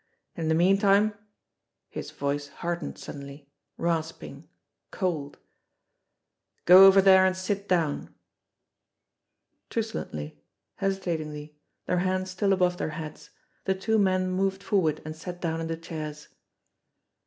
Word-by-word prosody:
"In 165 -3 -3
the 160 - +3
meantime" 195 +4 +4 0.7
his - - -7
voice 145 +1 -3
hardened 170 +2 -5
suddenly, 140 0 -10 0.3
rasping, 165 -1 -3 0.4
cold 160 -7 -3 1.3
"go 185 +2 +10
over 195 0 +6
there 190 -1 +7
and 185 0 +2
sit 200 +2 -3
down 165 -5 0 0.8
!" - - -54
Truculently, 75 - -4 0.4
hesitatingly, 155 -6 -3 0.3
their 180 - +1
hands 185 +1 -1
still 195 +2 0
above 180 -2 +2
their - - -2
heads, 155 -1 -8 0.4
the 190 - +1
two 220 +3 +1
men 185 -2 +2
moved 195 +1 -1
forward 165 -8 +1
and 155 0 -6
sat 175 +2 -8
down 165 -2 -2
in 165 - -3
the 165 0 -3
chairs. 155 -2 -7
175 Hz, 120 wpm, -27 LUFS, 155-190 Hz, 1.3 s, go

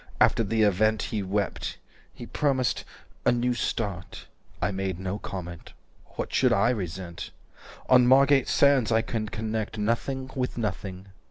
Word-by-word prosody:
After 115 - +4
the 110 +1 +1
event 110 +1 +2
He 105 - 0
wept. 100 +1 -2 0.3
He - - -10
promised 135 -4 0 0.4
'a - - +4
new 120 +1 +1
start.' 100 -6 -3 0.3
I - - 0
made 95 -2 -3
no 95 +2 -3
comment. 90 -5 -7 0.4
What - - -4
should - - +3
I 115 +5 +3
resent?" 90 -5 -5 0.6
"On 125 -1 +6
Margate 135 +1 +5
Sands. 140 -5 +4
300 115 - +2
I - - +3
can 110 -3 -3
connect 110 0 -3
Nothing 130 +5 -1
with 125 -2 -2
nothing. 95 -3 -4
110 Hz, 150 wpm, -27 LUFS, 95-125 Hz, 0.6 s, On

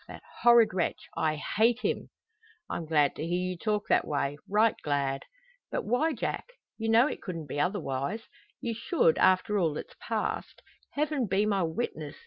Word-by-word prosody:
That - - -10 0.2
horrid 235 -4 +6
wretch! 180 -2 -1
I 155 -1 +1
hate 225 +10 +1
him!" - - -1 0.6
"I'm 165 - -4
glad 150 -3 +3
to - - -5
hear 175 +2 0
you 185 0 -2
talk 210 +3 -1
that - - +3
way 145 -1 -1
right 215 +2 +4
glad." 140 -2 -1 0.4
"But - - -2
why, 275 +9 +2
Jack? - - -4 0.3
You 225 0 -1
know 230 +3 +6
it 300 - -3
couldn't 170 -7 -5
be 145 +1 -4
otherwise! 180 +2 -1 0.4
You 235 - -2
should 230 - +2
after 185 +3 +3
all 160 -5 +1
that's - - -7
passed. - - -3 0.3
Heaven 290 -4 0
be 195 +2 +2
my 200 -2 +1
witness! 160 -4 -3
190 Hz, 170 wpm, -29 LUFS, 155-230 Hz, 0.6 s, horrid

